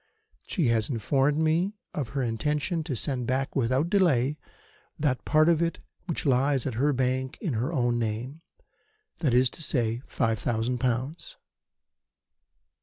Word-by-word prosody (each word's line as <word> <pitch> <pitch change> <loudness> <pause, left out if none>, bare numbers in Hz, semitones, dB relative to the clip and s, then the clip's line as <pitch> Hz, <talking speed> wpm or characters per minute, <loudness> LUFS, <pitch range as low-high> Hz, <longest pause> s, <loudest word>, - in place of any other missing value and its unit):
She 165 - +1
has 110 -2 +2
informed 135 +4 +1
me 165 +6 +1 0.2
of 135 -6 -3
her 135 - +1
intention 150 +8 -1
to 145 -6 -2
send 125 0 -1
back 135 +1 -1
without 130 +4 +1
delay 150 -8 +3 0.6
that 130 -7 0
part 155 +1 +4
of 170 -1 +4
it 170 0 0 0.3
which 170 - -3
lies 135 0 +2
at 130 - -2
her 140 +6 +2
bank 130 0 -1
in 170 - -2
her 120 +7 -1
own 120 -6 +1
name 120 +7 -3 0.8
that 135 -7 +2
is 125 0 +4
to - - -8
say, 120 -6 0
five 115 -1 0
thousand 120 +1 -1
pounds. 130 - -2
130 Hz, 150 wpm, -27 LUFS, 120-150 Hz, 0.8 s, part